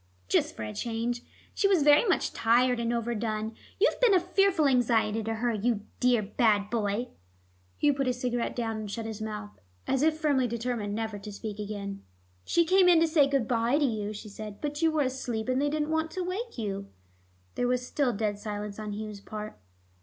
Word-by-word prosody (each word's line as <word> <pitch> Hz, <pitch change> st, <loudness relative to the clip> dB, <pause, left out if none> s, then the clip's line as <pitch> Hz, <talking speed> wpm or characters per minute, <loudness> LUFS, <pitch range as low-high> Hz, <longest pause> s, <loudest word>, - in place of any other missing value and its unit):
"Just -, -, +1 dB
for 110 Hz, -, -5 dB
a 105 Hz, 0 st, -5 dB
change. 235 Hz, -, -2 dB, 0.3 s
She 400 Hz, -, +2 dB
was 375 Hz, -6 st, +3 dB
very 295 Hz, +7 st, +6 dB
much 360 Hz, -, +1 dB
tired 245 Hz, +2 st, +3 dB
and 235 Hz, 0 st, 0 dB
overdone. 225 Hz, -2 st, -2 dB, 0.3 s
You've 450 Hz, -, +3 dB
been 460 Hz, -6 st, +6 dB
a -, -, +6 dB
fearful 365 Hz, -3 st, +2 dB
anxiety 225 Hz, -4 st, +2 dB
to 225 Hz, +1 st, -2 dB
her, 235 Hz, +1 st, 0 dB
you 215 Hz, 0 st, 0 dB, 0.2 s
dear 245 Hz, -3 st, +3 dB
bad 210 Hz, -1 st, +2 dB
boy." 220 Hz, +1 st, -1 dB, 0.7 s
Hugh 290 Hz, -1 st, +3 dB
put 275 Hz, -1 st, -1 dB
his 250 Hz, -1 st, -1 dB
cigarette 245 Hz, -1 st, -1 dB
down 225 Hz, -2 st, -2 dB
and 215 Hz, -1 st, -5 dB
shut 225 Hz, +2 st, -4 dB
his 220 Hz, -1 st, -6 dB
mouth, 210 Hz, -1 st, -6 dB, 0.3 s
as 270 Hz, -1 st, +1 dB
if 310 Hz, +1 st, +3 dB
firmly 285 Hz, -5 st, +2 dB
determined 230 Hz, -3 st, -2 dB
never 220 Hz, -2 st, -3 dB
to 210 Hz, +1 st, -8 dB
speak 210 Hz, 0 st, -6 dB
again. 200 Hz, -1 st, -5 dB, 0.4 s
"She 340 Hz, -, +2 dB
came 370 Hz, +1 st, +5 dB
in 340 Hz, -2 st, +6 dB
to 330 Hz, -, +4 dB
say 310 Hz, -3 st, +4 dB
good 275 Hz, -5 st, 0 dB
by 235 Hz, +3 st, +2 dB
to 295 Hz, -, +3 dB
you," 215 Hz, -4 st, -2 dB
she 215 Hz, +1 st, -8 dB
said, 210 Hz, 0 st, -8 dB
"but 295 Hz, +1 st, -3 dB
you 325 Hz, -, +4 dB
were 310 Hz, -2 st, +2 dB
asleep 255 Hz, -4 st, -3 dB
and 255 Hz, +1 st, +1 dB
they 290 Hz, -, +2 dB
didn't 305 Hz, +1 st, -1 dB
want 320 Hz, 0 st, 0 dB
to 370 Hz, -, -2 dB
wake 395 Hz, -, -4 dB
you." 200 Hz, -3 st, -3 dB, 0.7 s
There 245 Hz, -, 0 dB
was 250 Hz, 0 st, 0 dB
still 270 Hz, -1 st, +1 dB
dead 205 Hz, -2 st, -2 dB
silence 210 Hz, -1 st, -5 dB
on 210 Hz, -1 st, -4 dB
Hugh's 210 Hz, -1 st, -6 dB
part. 215 Hz, +1 st, -7 dB
235 Hz, 205 wpm, -28 LUFS, 215-285 Hz, 0.7 s, very